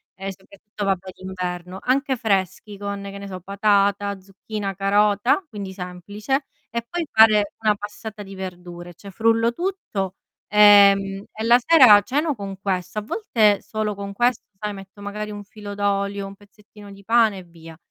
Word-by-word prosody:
e 195 0 -5
soprattutto 200 +2 -9
vabbè 190 -1 -1
d'inverno, 180 0 -6
anche 265 +1 +1
freschi 200 -1 -1
con, 200 0 -5
che 200 0 -7
ne 200 0 -8
so, 185 -2 -7
patata, 200 0 +1
zucchina, 200 +1 -6
carota, 205 - +2
quindi 200 -3 -7
semplice, 205 +9 -4 0.2
e 235 0 -4
poi 350 -2 -2
fare 215 -2 +5
una 215 -1 +2
passata 210 +1 -8
di 195 - -11
verdure, 175 -2 -8
cioè 200 +4 -12
frullo 230 +2 +2
tutto, 240 - -4 0.3
ehm, 200 -1 +6
e 220 - -5
la 240 +2 +5
sera 255 -9 +8
ceno 295 +6 0
con 195 -2 -7
questo. 185 +1 -2
A - - -5
volte 215 - +1
solo 215 -1 -3
con 200 0 -6
questo, 240 +2 +1
sai, 210 0 -4
metto 195 +1 -12
magari 210 +1 -5
un 205 0 -7
filo 205 0 -9
d'olio, 200 0 -1
un 195 - -10
pezzettino 205 0 -17
di 200 - -15
pane 225 -2 +3
e 185 - -11
via. 165 -1 -14
205 Hz, 165 wpm, -22 LUFS, 195-215 Hz, 0.3 s, sera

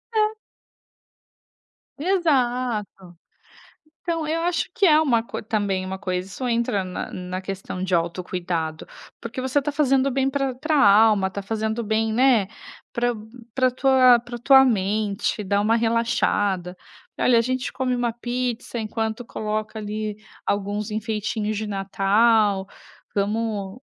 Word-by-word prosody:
É. 430 0 +3 1.7
Exato. 250 - 0 0.9
Então, 330 -2 -2
eu 320 +2 -1
acho 340 -1 0
que 400 - +2
é 310 -2 +6
uma 245 -7 +2
co 230 - -6
também 200 -3 -1
uma 190 0 -5
coisa 185 -2 -3
isso 250 +5 -4
entra 230 -4 0
na 185 -1 -5
na 185 +1 -5
questão 185 -1 -5
de 185 -1 -2
autocuidado, 170 -1 -2 0.3
porque 240 +2 -6
você 260 +2 +1
está 285 +1 -3
fazendo 275 -2 +2
bem 270 +1 +1
pra 270 -2 -1
pra 310 +4 -1
alma, 210 -4 +5
está 200 +1 -5
fazendo 220 +2 -2
bem, 220 +1 0
né, 240 -5 +4 0.5
pra 245 0 +1 0.4
pra 260 -1 +3
tua 255 -1 +5
pra 240 +1 -8
tua 265 +2 +7
mente, 210 -2 0
dar 200 +1 +1
uma 215 +3 +2
relaxada. 210 -5 0 0.4
E - - -5
olha: 245 -2 +5
"A - - +5
gente 255 +1 -2
come 255 -1 -1
uma 240 -1 -1
pizza 240 0 -3
enquanto 220 +2 -3
coloca 215 -1 -4
ali 215 0 -4 0.3
alguns 205 +1 -2
enfeitinhos 215 0 -2
de 215 0 -3
Natal, 200 +1 +2 0.5
vamos 205 0 -2
220 Hz, 140 wpm, -23 LUFS, 200-255 Hz, 1.7 s, tua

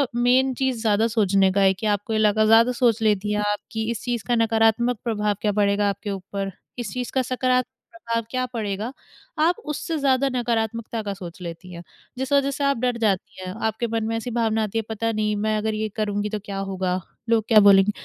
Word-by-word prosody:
Main 255 +2 +3
चीज़ 255 -2 -1
ज़्यादा 220 0 +2
सोचने 195 -4 +3
का 200 +1 +1
है 190 0 +5
कि 205 +4 -7
आपको 205 +2 -3
ये 215 - +1
लगा 215 0 +3
ज़्यादा 225 +3 +6
सोच 240 -3 +2
लेती 210 -1 +1
हैं 210 - 0
आप 205 - -2
कि 220 0 -2
इस 230 - -4
चीज़ 240 -3 -2
का 240 - +2
नकारात्मक 225 +1 +2
प्रभाव 210 -3 0
क्या 210 - +1
पड़ेगा 205 0 +2
आपके 200 +1 -5
ऊपर। 195 +1 -4 0.3
इस 230 -5 -4
चीज़ 250 -2 -4
का 260 - +1
सकारात्मक 255 0 0 0.2
प्रभाव 230 -6 -2
क्या 255 0 0
पड़ेगा, 215 0 -3 0.5
आप 330 +3 +3
उससे 310 +2 -3
ज़्यादा 275 -1 +2
नकारात्मकता 230 -1 -1
का 200 -1 -3
सोच 180 -2 -10
लेती 175 +1 -8
हैं। 170 0 -9 0.3
जिस 265 +2 -2
वज़ह 280 0 +3
से 280 - -3
आप 280 -1 +2
डर 245 0 0
जाती 195 -4 -1
हैं, 185 0 -5
आपके 220 +2 -1
मन 225 0 -1
में 225 - -1
ऐसी 240 +2 -5
भावना 225 -1 +1
आती 215 +1 -3
है - - +2
पता 225 +1 -1
नहीं 210 -1 0
मैं 215 +1 0
अगर 220 +1 -1
ये 215 0 -2
करूँगी 210 -1 -1
तो 215 0 -3
क्या 200 -1 -5
होगा, 190 -1 -2 0.3
लोग 225 -1 +3
क्या 220 -2 +7
बोलेंगे? 200 0 +6
220 Hz, 220 wpm, -23 LUFS, 205-240 Hz, 0.5 s, क्या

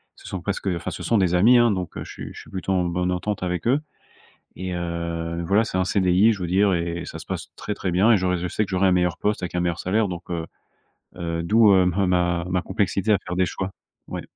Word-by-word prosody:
ce - - -14
sont 95 - -5
presque 100 +1 -3
enfin 85 -3 -2
ce - - -7
sont 115 - +2
des 90 -2 +2
amis, 120 +7 +6
hein 120 - +5
donc 95 -5 -2
je - - -8
suis - - -8
je - - -10
suis - - -16
plutôt 95 0 -4
en 90 -1 +1
bonne 90 +1 -1
entente 95 +2 -2
avec 90 +3 -2
eux. 135 +5 +3 0.8
Et 90 0 -4
heu, 85 -1 -3
voilà 100 +4 +4
c'est 95 -4 -3
un 95 - +2
CDI 95 +3 +3
je 100 - -6
veux 90 - -2
dire 95 +2 +3
et 85 0 -2
ça 80 - -8
se 80 - -11
passe 95 -3 -5
très, 105 - -4
très 95 -2 -3
bien 95 +6 +4
et 115 - +7
j'aurais 90 -1 0
je 90 +1 -3
sais 105 - 0
que 100 - -10
j'aurais 95 0 +3
un - - +4
meilleur 90 -2 +1
poste 105 -2 -1
avec 90 - -6
un 90 - +1
meilleur 85 -1 -1
salaire 105 +3 +1
donc, 90 -2 -7
heu 85 -2 -3 0.7
heu, 85 -1 -3
d'où, 105 +3 +5
heu, 95 -1 +5
m 90 +2 +1 0.4
ma 90 0 +1
complexité 100 +1 0
à 105 - +5
faire 90 - -3
des 95 0 +3
choix. 95 +1 -4 0.4
Ouais. - - -5
90 Hz, 260 wpm, -23 LUFS, 85-100 Hz, 0.8 s, et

